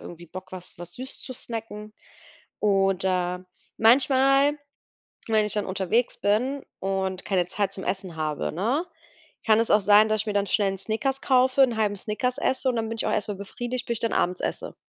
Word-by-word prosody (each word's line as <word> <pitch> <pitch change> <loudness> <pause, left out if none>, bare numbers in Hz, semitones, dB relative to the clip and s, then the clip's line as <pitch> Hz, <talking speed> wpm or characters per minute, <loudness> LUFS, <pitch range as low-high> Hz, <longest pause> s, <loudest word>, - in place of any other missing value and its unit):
irgendwie 175 0 -10
Bock, 185 +2 -10
was 180 -2 -10
was 175 0 -10
süß 260 +2 -8
zu 255 - -7
snacken. 225 -3 -5 0.7
Oder, 190 -2 +1 0.3
manchmal, 275 +4 +4 0.7
wenn 220 -2 +3
ich 210 - -1
dann 210 - -1
unterwegs 195 +5 0
bin 250 +7 0 0.2
und 190 -1 -2
keine 185 -3 +1
Zeit 195 +1 -1
zum 190 - -6
Essen 185 -2 -3
habe, 155 -2 -2
ne, 235 - 0 0.6
kann 220 -1 +5
es 230 - +1
auch 210 - +6
sein, 210 +2 +6
dass 215 -1 +1
ich 220 - -9
mir 210 - -1
dann 200 0 +1
schnell 200 0 +2
'n 195 - -5
Snickers 265 +7 -2
kaufe, 260 0 +3
'n 245 -4 +4
halben 210 -2 +1
Snickers 235 +6 -2
esse 260 +1 0
und 245 - -1
dann 225 -1 -2
bin 225 - -4
ich - - -2
auch - - 0
erst 210 - 0
mal 205 - -2
befriedigt, 240 +5 -5
bis 235 - -1
ich - - -6
dann 230 - 0
abends 180 +1 0
esse. - - -4
210 Hz, 200 wpm, -25 LUFS, 190-245 Hz, 0.7 s, auch